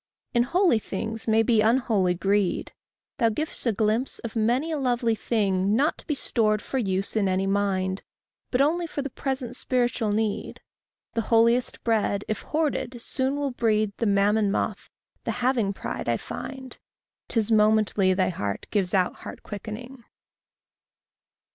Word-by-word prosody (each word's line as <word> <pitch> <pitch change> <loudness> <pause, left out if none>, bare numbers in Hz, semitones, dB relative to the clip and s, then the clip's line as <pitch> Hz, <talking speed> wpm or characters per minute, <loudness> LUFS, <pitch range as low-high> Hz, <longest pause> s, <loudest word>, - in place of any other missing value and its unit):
In 240 - +4
holy 340 - +3
things 220 +3 -5
may 220 0 +4
be 225 -1 +3
unholy 215 -6 +2
greed. 195 0 0 0.5
Thou 230 -2 +4
giv'st 300 +3 -2
a - - +4
glimpse 220 +4 0
of 230 - -7
many 240 +8 +1
a 310 - -1
lovely 245 -3 +1
thing, 200 -3 +1
Not 285 +6 +1
to - - -4
be 300 - 0
stored 215 -5 +1
for 265 +5 -3
use 195 -3 -1
in 200 -3 +2
any 185 +1 +1
mind, 195 -1 0 0.5
But 250 - +2
only 335 +4 +2
for 285 -3 -4
the 275 - -5
present 260 -3 -3
spiritual 245 -4 0
need. 215 0 -2 0.5
The 230 - 0
holiest 235 +2 +3
bread, 210 -3 +1
if 215 - -2
hoarded, 285 -6 -2
soon 265 +3 -1
will 285 -1 -1
breed 215 -4 +1
The 230 - 0
mammon 205 +1 +3
moth, 195 - -2 0.3
the - - -4 0.2
having 235 -6 +2
pride, 195 - -4
I - - +2
find. 265 -1 -8 0.5
'Tis 225 -1 0
momently 210 -3 +3
thy 185 0 +2
heart 100 - -3
gives 195 -3 +1
out 185 -2 +1
heart - - -9
quickening. 230 +5 -8
225 Hz, 155 wpm, -26 LUFS, 200-250 Hz, 0.5 s, In